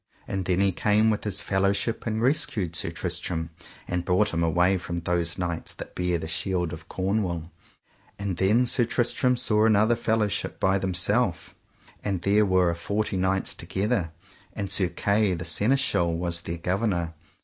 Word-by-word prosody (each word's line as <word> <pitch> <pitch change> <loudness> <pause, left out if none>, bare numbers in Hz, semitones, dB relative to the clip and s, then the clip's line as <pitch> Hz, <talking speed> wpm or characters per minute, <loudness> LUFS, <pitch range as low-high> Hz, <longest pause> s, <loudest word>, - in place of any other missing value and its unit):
And 95 -2 -3
then 95 +1 +1
he 100 -1 +3
came 105 +4 +2
with 105 - -3
his 100 -3 -1
fellowship 100 +4 0
and 110 +1 -1
rescued 110 - +1
Sir 80 - 0
Tristram, 85 -1 -3 0.4
and 90 0 -2
brought 95 +3 +2
him 85 - 0
away 90 +3 +2
from 85 -2 -4
those 85 0 -1
knights 85 -2 -3
that - - -9
bare 90 -1 0
the 80 -1 -5
shields 90 +1 -1
of 80 - -9
Cornwall. 95 -4 -2 0.7
And 100 -3 -3
then 105 +7 +3
Sir 125 0 +2
Tristram 125 +1 +1
saw 105 -2 +3
another 110 +2 +4
fellowship 110 -3 -1
by 95 +1 +2
themself, 95 +1 0 0.5
and 95 -4 -2
there 105 +2 +3
were 90 -2 +3
a - - -3
forty 100 +4 -2
knights 95 +1 0
together, 95 0 -2 0.4
and 100 -2 -4
Sir 95 -2 +3
Kay, 100 +2 +1
the 85 +1 -6
Seneschal, 90 - +1
was 85 -1 0
their 85 0 -5
governor. 90 -1 -1
95 Hz, 165 wpm, -26 LUFS, 85-105 Hz, 0.7 s, another